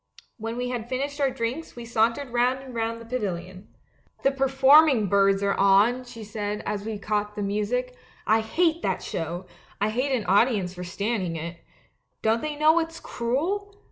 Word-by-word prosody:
When 225 +1 -5
we 250 0 -2
had 240 -2 -4
finished 280 +3 -3
our 275 - +3
di'inks 250 +6 -4
we 240 -1 -8
sauntered 230 +3 +1
round 245 +2 +2
and 260 -2 -10
round 230 0 -2
the 230 - -11
pavilion. 190 -5 -4 0.3
" - - -34
'The 275 - +4
performing 270 -1 +5
birds 195 0 +3
are 200 0 +2
on,' 205 +6 +4
she 235 -2 -10
said, 210 0 -4
as 205 -1 -2
we 220 0 -4
caught 210 0 -2
the 205 - -3
music; 220 +5 -1 0.3
'I 220 +1 +4
hate 325 +9 +1
that - - -1
show, 170 +3 -4 0.3
I 205 +2 +1
hate 255 +5 0
an 240 -6 0
audience 200 -2 +2
for 180 -1 -7
standing 190 -1 -2
it. 170 +1 -6 0.6
Don't 225 +1 +2
they 305 -1 -3
know 310 +3 +4
it's 330 0 -4
cruel? 370 +13 -2
230 Hz, 180 wpm, -25 LUFS, 205-265 Hz, 0.6 s, performing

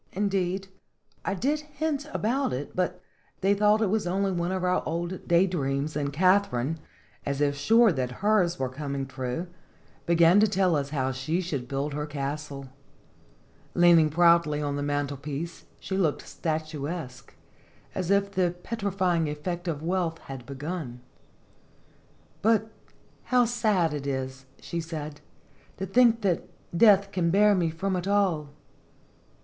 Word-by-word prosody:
Indeed, 195 -1 -1 0.6
I 200 - -1
did 285 +9 0
hint 300 0 -3
about 255 - 0
it, 135 +3 -5
but 180 0 -1 0.4
they 195 +1 +4
thought 210 +2 +3
it 210 -1 0
only 195 +2 0
one 175 0 -1
of 190 -1 -2
our 180 0 +2
old 170 +3 -4
day 175 +2 +5
dreams, 145 -4 -2
and 145 -1 -1
Katharine, 165 -4 +2 0.4
as 140 0 -2
if 145 -1 +2
sure 225 +9 +5
that 130 -5 -2
hers 195 -5 +3
was 130 -3 -2
coming 140 -1 -3
true, 130 +4 -4 0.6
began 170 +2 +6
to 215 - +5
tell 190 -4 +2
us 140 -1 -1
how 135 -3 -1
she 135 +7 -2
should 145 -9 -3
build 140 +3 -2
her 150 +1 -3
castle. 140 -1 -5 1.1
Lean 175 -1 +7
ing 155 -1 +3
proudly 170 -2 +4
on 145 -1 -2
the 145 - -2
mantelpiece, 145 +2 -3
she 190 - -4
looked 170 -6 0
statuesque, 155 -2 -4 0.6
as 185 -2 -3
if 200 0 +2
the 180 -2 +1
petrifying 185 -7 0
effect 175 +4 -4
of 155 -2 -3
wealth 170 -1 0
had 135 -2 -9
begun. 140 -2 -5 1.4
"But 220 0 +2 0.5
how 250 -1 +4
sad 215 -9 +1
it 140 -1 -4
is," 130 -1 -4
she 170 - -4
said, 155 -3 -6 0.6
"to 190 - -3
think 230 +3 +4
that 185 -4 0 0.3
death 200 0 +5
can 175 -4 +1
bear 205 +4 +5
me 175 -4 +1
from 185 +4 -2
it 180 +1 -3
all." 190 -7 +1
170 Hz, 145 wpm, -27 LUFS, 145-195 Hz, 1.4 s, Lean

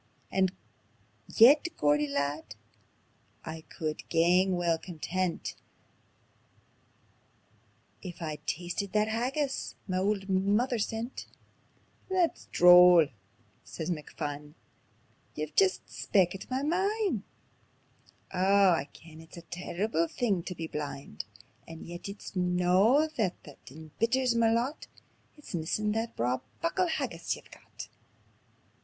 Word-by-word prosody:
And 190 -1 +2 0.8
yet, 280 +8 +6
Geordie 150 0 +3
lad, 140 -4 -3 0.9
I 160 0 -6
could 155 -1 -5
gang 180 +3 +3
weel 170 -2 +1
content 180 +1 -3 2.5
If 180 -3 -8
I'd 155 -3 -6
tasted 180 +3 -3
that 215 0 +2
haggis 265 +5 -2
ma 185 -1 0
auld 195 0 0
mither 205 +6 +1
sent." 225 +4 -4 0.8
"That's 365 -3 0
droll," 180 -3 +7 0.5
says 165 +2 -5
McPhun; 150 -1 -5 0.8
"ye've - - -5
jist 390 -2 +3
speakit 190 -1 0
ma 260 +2 -1
mind. 380 - 0 1.1
Oh 195 +1 +4
I 160 -4 0
ken 160 -1 -14
it's 160 +2 -14
a 170 - -9
terrible 175 0 -2
thing 200 -5 0
tae 180 +2 -6
be 165 - -5
blind; 145 - -6 0.4
And 165 0 -9
yet 175 +3 -7
it's 200 0 -9
no 180 - +3
that 205 -6 -1
that 145 - -13
embitters 230 - -1
ma 230 -1 +3
lot 240 +6 -1 0.5
It's 295 - -12
missin' 180 +6 -1
that 225 +2 -2
braw 125 +2 0 0.2
muckle 345 +2 +1
haggis 325 - -2
ye've - - -16
got." - - -11
185 Hz, 110 wpm, -29 LUFS, 165-230 Hz, 2.5 s, droll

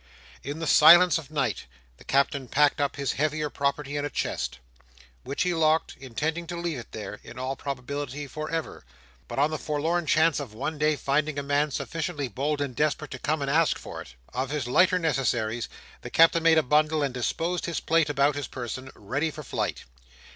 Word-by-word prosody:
In 145 +3 -5
the 165 - -4
silence 165 +2 +7
of 155 - -11
night, 135 -10 -2 0.3
the - - -16
Captain 140 -1 +1
packed 145 +3 +3
up 140 - 0
his 140 -2 -1
heavier 150 0 -1
property 140 0 -1
in 145 - -1
a 145 - -2
chest, 65 - -3 0.7
which 140 - -1
he 180 -1 +1
locked, 160 -1 +2
intending 155 +7 -3
to 175 - -5
leave 170 -5 -3
it 120 - -11
there, 105 -1 -7
in - - -11
all 130 +1 -3
probability 140 +1 -5
for 155 +2 -6
ever, 165 -1 -4 0.4
but - - -7
on 145 +3 +3
the 155 - -3
forlorn 160 +3 -1
chance 155 +1 +3
of 125 -7 -7
one 145 +6 -4
day 155 0 +3
finding 145 +1 0
a 145 - -2
man 145 +2 +1
sufficiently 155 0 -3
bold 145 +6 -2
and 135 -4 -3
desperate 150 +1 0
to 130 - -6
come 150 +1 -1
and 140 - -1
ask 160 +1 +3
for - - -8
it. - - -13 0.2
Of 130 +1 -2
his 145 -4 -2
lighter 180 +9 +4
necessaries, 120 -8 0 0.3
the - - -7
Captain 165 +1 +5
made 165 -1 +5
a 160 - +4
bundle; 155 +2 +2
and 135 -3 -1
disposed 165 +8 -2
his 170 - -2
plate 165 -2 +2
about 145 +1 +3
his 145 -2 -4
person, 130 +1 -6
ready 140 +10 -2
for 150 0 -8
flight. - - -3
145 Hz, 200 wpm, -26 LUFS, 135-155 Hz, 0.7 s, silence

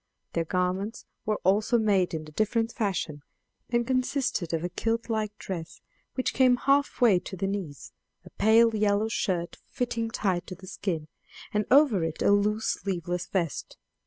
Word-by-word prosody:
Their 165 - 0
garments 185 +6 -1 0.2
were 215 -1 +1
also 210 +6 +3
made 200 -6 +2
in 155 - -4
a 155 - -12
different 225 +6 0
fashion, 190 -10 -2 0.5
and 235 0 +1
consisted 255 - 0
of 165 -1 -1
a 175 - -1
kilt 230 +5 -2
like 215 -1 -2
dress, 170 -4 -6 0.4
which 255 - -1
came 255 -1 +5
half 280 +1 +1
way 215 -7 +6
to 190 - -8
the 195 - -1
knees, 195 -8 -5 0.3
a - - -13
pale 225 +2 +4
yellow 210 +1 +2
shirt 175 -5 -2
fitting 235 -3 -2
tight 190 -6 -1
to 185 - -6
the 185 - -13
skin, 170 -5 -3 0.5
and 210 0 0
over 260 - +5
it 160 -1 -2
a - - +5
loose 210 +2 +1
sleeveless 180 -2 -3
vest. 170 -6 -2
205 Hz, 165 wpm, -27 LUFS, 180-230 Hz, 0.5 s, way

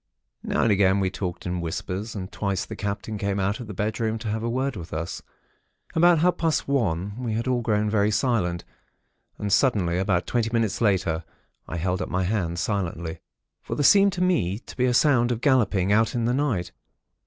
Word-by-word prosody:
"Now - - 0
and 115 - +3
again 100 -1 +3
we 95 -1 0
talked 90 -3 -5
in 90 -1 -2
whispers; 95 +6 -4
and 95 -1 -6
twice 100 -3 -2
the - - -7
Captain 105 +1 -4
came 100 0 -1
out 100 +2 0
of 120 - -7
the 105 - -6
bedroom 110 +2 -1
to 110 0 -5
have 110 +1 -2
a 115 - -2
word 130 +2 -1
with 85 -3 -8
us. 85 +2 -4 0.7
About 170 +1 +5
half 175 +3 +2
past 165 -2 0
one, 100 -8 0
we 115 -3 -2
had 115 +3 -2
all 125 -1 +1
grown 105 -2 +1
very 105 -1 +2
silent; 105 -6 0 0.7
and 100 -2 -1
suddenly, 95 -10 +2
about 95 -2 +1
twenty 115 -2 0
minutes 115 -2 0
later, 90 -6 +1 0.4
I 85 - -4
held 90 +2 -1
up - - -3
my 95 +1 0
hand, 90 -3 -1
silently; 85 -4 -2 0.4
for - - -5
there 145 - 0
seemed 200 +5 +6
to 180 -1 -1
me 105 - +1
to 120 - -12
be 125 - +1
a 125 - +2
sound 120 -3 +4
of 115 - -1
galloping, 110 -8 +2
out 110 +3 +3
in 120 -1 0
the 120 - +1
night. 120 - -1
105 Hz, 205 wpm, -25 LUFS, 95-120 Hz, 0.7 s, seemed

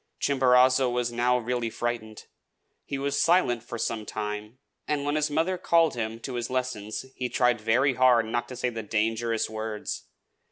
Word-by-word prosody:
Chimborazo 130 -1 +4
was 120 -1 -1
now 120 +1 +2
really 120 -1 -2
frightened. 115 -2 -4 0.6
He 140 - -4
was 140 +1 0
silent 165 -9 +3
for 120 0 -7
some 115 -1 -2
time; 105 +2 -5 0.3
and 145 -1 -1
when 145 - 0
his 150 0 +1
mother 165 +5 0
called 165 -2 +3
him 115 -1 -4
to 130 - -5
his 120 -1 -3
lessons 125 -4 -3
he 125 -1 -3
tried 125 -3 +2
very 125 +5 +3
hard 125 -2 +4
not 120 +2 -2
to 125 - -8
say 125 0 -1
the 115 -1 -5
dangerous 110 +2 0
words. 110 -1 -5
120 Hz, 170 wpm, -27 LUFS, 115-130 Hz, 0.6 s, Chimborazo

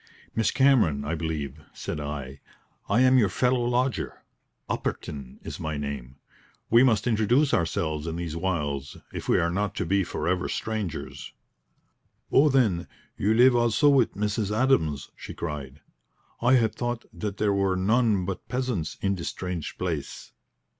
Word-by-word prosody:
"Miss 115 - +2
Cameron, 120 - +3
I 75 - -2
believe," 75 -3 -3
said - - -5
I. 70 -2 -5 0.5
"I 110 +5 +4
am 130 0 +6
your 105 -5 +3
fellow 125 +1 +1
lodger. 125 +1 -1 0.4
Upperton 70 -4 -4
is - - -7
my 80 -1 -3
name. 70 -3 -5 0.6
We 115 +1 +7
must 115 -5 +3
introduce 120 +5 +2
ourselves 80 -1 0
in 80 - -3
these 85 -2 -4
wilds 75 -6 -2 0.2
if - - -6
we - - +5
are 85 0 +1
not 100 +2 -1
to - - -1
be 100 +3 +2
for 85 - -4
ever 90 0 0
strangers." 110 -7 -4 1.0
"Oh, 150 +2 +6
then, 110 -11 +2 0.3
you 105 +3 +1
live 125 +2 +6
also 120 +5 +4
with 135 -5 +3
Mrs. 105 0 -1
Adams!" 95 - +1
she - - -9
cried. 75 -3 -6 0.6
"I 125 +2 +4
had 115 -4 +3
thought 120 -1 -3
that 105 -2 -4
there 105 -1 +2
were 100 -1 +1
none 105 0 +2
but 95 -1 -5
peasants 125 -11 -2
in 100 0 +2
this 85 -3 -3
strange 90 -5 -5
place." 85 -6 -4
95 Hz, 155 wpm, -26 LUFS, 80-120 Hz, 1.0 s, We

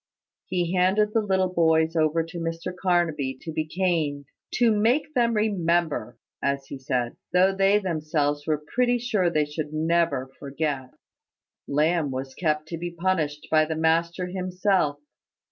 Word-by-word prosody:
He 175 -1 -1
handed 195 +4 +2
the 225 - +3
little 190 -3 0
boys 160 -1 +3
over 160 0 +2
to 165 +1 -8
Mr 165 +2 -4
Carnaby 170 -8 0
to 160 - -7
be 155 0 -2
caned 155 -5 -1 0.3
"To 240 -2 +4
make 245 +9 +1
them 235 -3 +2
remember," 170 - 0 0.2
as 140 0 -1
he 135 - -8
said; 125 -2 -2 0.2
though 185 +2 +4
they 195 +1 +4
themselves 155 -5 -1
were 150 -1 0
pretty 245 0 +3
sure 220 -7 +1
they 155 -3 +1
should 150 0 -5
never 155 -4 +1
forget. 140 -2 -3 0.8
Lamb 155 +1 +1
was 130 0 -5
kept 155 0 -1
to 165 - -5
be 175 +1 -3
punished 165 -4 -1
by 155 -1 +5
the 160 +1 -2
master 165 +3 +1
himself. 185 -3 0
165 Hz, 150 wpm, -25 LUFS, 150-185 Hz, 0.8 s, by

